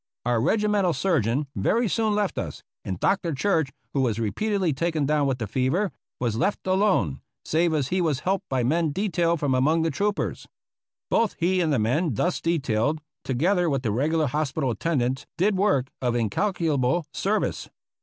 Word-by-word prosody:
Our 120 -2 +2
regimental 210 - +2
surgeon 145 - +1
very 235 +1 +1
soon 215 +1 +1
left 205 -2 0
us, - - -6 0.2
and 95 -2 -4
Dr. 180 -5 +1
Church, 160 -3 +1 0.2
who 135 - +1
was 115 -5 0
repeat 115 - -2
edly 185 -8 +1
taken 160 -1 0
down 150 0 +2
with 135 -2 0
the 115 - -3
fever, 130 - 0 0.3
was 120 -3 -1
left 200 - -1
alone 185 - +1
— - - -60
save 165 0 +2
as 140 -4 0
he 185 0 +1
was 155 -5 0
helped 190 +1 -1
by 130 -2 0
men 155 +4 +1
detailed 170 -4 +1
from 145 -3 +1
among 155 +6 +2
the 165 - +1
troopers. 205 +8 -2 0.6
Both 225 -2 +2
he 180 +2 +1
and 160 -3 +1
the 140 - +2
men 125 +6 +1
thus 175 - 0
detailed, 145 -3 0 0.2
together 175 +7 +1
with 135 -3 -1
the 110 - 0
reg 135 +9 0
ular 155 -4 +2
hospital 145 -1 -1
attendants, 130 +1 -1
did 195 +3 +2
work 185 -10 +1
of 120 -2 0
incalculable 150 - 0
service. 210 +2 -1
155 Hz, 180 wpm, -25 LUFS, 130-185 Hz, 0.6 s, Our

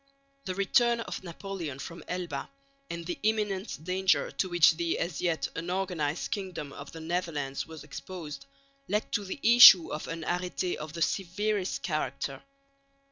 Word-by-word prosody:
The 185 - -3
return 235 +5 +3
of 225 - -6
Napoleon 175 -5 -6
from 170 +4 -8
Elba, 175 -6 -4 0.4
and 170 0 -5
the 175 - -4
imminent 210 -6 -1
danger 185 -4 +1
to 145 +7 -1
which 175 -2 +6
the, 170 -1 0
as 165 -4 -3
yet, 170 -3 0
unorganised 175 -3 -2
kingdom 185 -8 -4
of 140 - -9
the 165 - -9
Netherlands 160 -5 -3
was 160 -1 -10
exposed, 150 - -8 0.4
led 210 +1 -1
to 205 - 0
the 195 +8 -6
issue 230 -7 +9
of 150 - -5
an 165 0 -5
arrêté 180 +1 -1
of 155 0 -7
the 170 -1 0
severest 200 +1 -1
character. 140 -4 -2
175 Hz, 150 wpm, -29 LUFS, 155-190 Hz, 0.4 s, issue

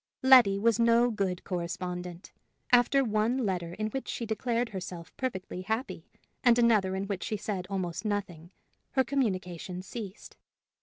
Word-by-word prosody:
Letty 250 -7 +7
was 230 +3 +2
no 235 +1 +4
good 190 -4 -2
correspondent: 180 0 -5 0.4
after 250 +3 +5
one 225 +2 +1
letter 175 -3 -2
in 215 0 -2
which 270 +4 -5
she 235 - -3
declared 230 +2 -1
herself 180 -4 -7
perfectly 190 -8 -4
happy, 220 +7 -3 0.4
and 240 -2 +6
another 215 -6 +3
in 190 - -2
which 200 -2 -4
she 215 - -2
said 190 -3 -4
almost 185 -3 -3
nothing, 195 -6 -3 0.4
her 265 - +4
communication 185 - -2
ceased. 205 0 -8
205 Hz, 145 wpm, -29 LUFS, 185-235 Hz, 0.4 s, Letty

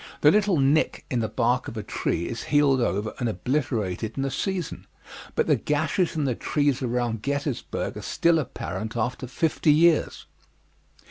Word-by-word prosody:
The 150 - +7
little 205 -2 +3
nick 140 +3 +2
in 125 - +1
the 110 -2 -1
bark 120 +2 +1
of 115 - -7
a 105 - -3
tree 85 - -2
is 115 - -5
healed 145 -3 +3
over 105 -1 -1
and 120 -3 0
obliterated 110 -2 -2
in 135 - 0
a 135 - -2
season, 190 -2 -3 0.5
but - - +2
the - - +4
gashes 160 +5 0
in 155 - 0
the 130 - +1
trees 145 +2 0
around 120 -3 -1
Gettysburg 140 0 -3
are - - -6
still 170 -1 +2
apparent 110 -5 -5
after 125 +3 -2
fifty 155 +4 +1
years. 160 +1 +3
135 Hz, 170 wpm, -25 LUFS, 115-150 Hz, 0.5 s, The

